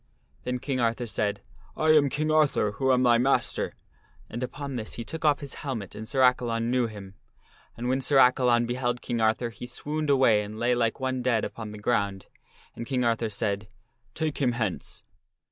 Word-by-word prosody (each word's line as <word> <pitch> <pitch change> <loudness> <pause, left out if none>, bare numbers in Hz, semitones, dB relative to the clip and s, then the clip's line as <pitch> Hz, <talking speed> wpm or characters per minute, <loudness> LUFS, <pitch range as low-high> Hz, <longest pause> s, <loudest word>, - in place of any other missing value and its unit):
Then 125 0 -1
King 130 0 -3
Arthur 115 +1 0
said, 105 -2 -2 0.2
" - - -27
I 155 0 +4
arn 145 -2 +5
King 155 +4 -1
Arthur 150 -9 +3
who 130 +5 0
am 130 0 +3
thy 120 -1 +5
master." 135 +3 +1 0.6
And 120 - -5
upon 140 +2 -5
this 110 -3 -5
he 115 - -5
took 160 +6 -6
off 150 -1 +3
his 140 - -7
helmet 115 -9 -4
and 110 - -8
Sir 135 -1 0
Accalon 120 -2 +2
knew 125 -2 +2
him. 100 -3 -10 0.6
And 120 +1 -3
when 130 +2 +1
Sir 135 +2 +2
Accalon 125 -2 +5
beheld 120 0 -2
King 120 -2 -2
Arthur 110 +2 +1
he 120 - -9
swooned 150 +4 -3
away 130 -6 +4
and 105 +1 -7
lay 120 +2 +2
like 115 0 0
one 130 -1 -1
dead 120 -3 +1
upon 110 -2 -7
the 105 - -8
ground, 100 -3 -1 0.5
and 115 - -6
King 130 -2 0
Arthur 115 -1 +1
said, 100 0 -2 0.2
" 120 0 -41
Take 160 -2 -2
him 125 -4 +2
hence." 110 -6 -3
120 Hz, 200 wpm, -27 LUFS, 115-130 Hz, 0.6 s, arn